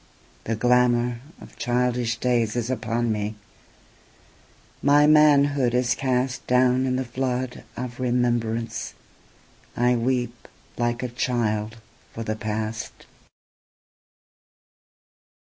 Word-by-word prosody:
The 115 - -1
glamourOf 125 +3 0
childish 120 -1 0
days 120 -3 +1
is 120 +1 -1
upon 115 -1 -1
me, 105 0 -2 1.5
my 145 +1 +5
manhood 145 -4 +4
is 125 0 +2
castDown 130 0 +1
in 130 - 0
the 130 0 -1
flood 125 0 -3
of 125 0 -6
remembrance, 120 -2 -1 0.8
I 125 +1 +3
weep 120 0 -2 0.3
like 120 +1 -1
a - - -1
child 115 -3 -1 0.4
for 115 - -5
the 110 0 -2
past. 110 0 -5
120 Hz, 90 wpm, -24 LUFS, 115-125 Hz, 1.5 s, my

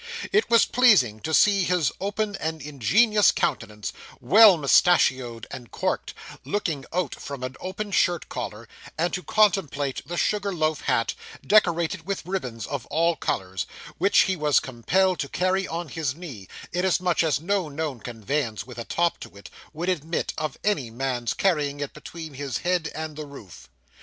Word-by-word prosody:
It 415 +3 +2
was 230 -1 +6
pleasing 200 - +4
to 160 - -4
see 200 +4 +4
his 180 -4 +1
open 205 +1 -2
and 160 +1 -3
ingenuous 195 - +3
countenance, 105 0 -2 0.3
well 200 - +7
mustachioed 130 -6 +3
and 120 -3 -8
corked, - - -2 0.3
looking 160 -9 -2
out 180 -6 -1
from 140 -2 -7
an 130 +1 -5
open 200 +3 -5
shirt 175 -3 +1
collar; 115 -2 -6 0.3
and 170 +2 0
to 180 - -2
contemplate 180 -11 +1
the 175 - -4
sugar 205 +1 0
loaf 155 -2 0
hat, 125 -4 +1 0.3
decorated 175 -4 +2
with 195 -5 -3
ribbons 130 - -4
of 140 -4 -5
all 165 +3 +2
colours, 95 - -3 0.3
which 200 - +5
he 190 - +1
was 150 -3 +3
compelled 180 +10 0
to 140 - -3
carry 185 +1 0
on 170 +1 -4
his 145 -2 -3
knee, 140 - -9 0.3
inasmuch 180 -1 +1
as 160 -4 +1
no 185 0 -1
known 145 -3 -4
conveyance 115 0 -3
with 125 -1 -10
a 115 - -5
top 170 0 0
to - - -11
it, 100 - -12 0.2
would 165 +3 -5
admit 165 -2 -1
of 155 -3 -4
any 150 - 0
man's 120 -1 -2
carrying 150 -7 +1
it 145 -1 -4
between 160 0 -9
his 135 -2 -3
head 175 -2 0
and 155 -1 -5
the 150 -1 -7
roof. 95 - -13
160 Hz, 165 wpm, -25 LUFS, 130-185 Hz, 0.3 s, well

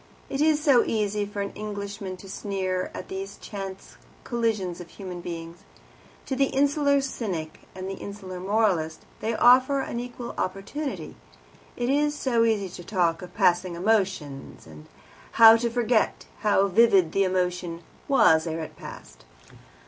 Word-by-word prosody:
It 275 - -1
is 310 -1 +4
so 280 -6 +5
easy 210 -2 -1
for 205 0 -3
an 200 - -5
Englishman 200 -2 -6
to 195 - -12
sneer 190 -2 -2
at - - -8
these 195 +1 -6
chance 190 - -8 0.3
collisions 215 -7 -1
of 175 - -11
human 185 -3 -8
beings. 165 -1 -7 0.7
To 265 - -2
the 275 +1 +3
insular 280 +1 +2
cynic 190 -12 -5
and 185 0 -6
the 195 - -4
insular 195 -3 -7
moralist 185 -5 0 0.2
they 225 +1 -1
offer 255 +4 +5
an 235 - -4
equal 245 0 -6
opportunity. 195 - -4 0.6
It 240 - -1
is 295 +1 +2
so 235 -5 +2
easy 210 -4 +1
to 175 0 -9
talk 170 -4 0
of 180 -1 -10
"passing 175 0 +2
emotion," 185 -8 -1
and 75 -1 -13 0.5
how 225 -1 +9
to 235 +1 -1
forget 235 -1 +1
how 205 -2 +3
vivid 195 -4 +4
the 195 - +2
emotion 180 -2 -1 0.2
was 160 - +4
ere 165 0 -3
it 155 - -8
passed. - - -11
200 Hz, 150 wpm, -26 LUFS, 180-235 Hz, 0.7 s, how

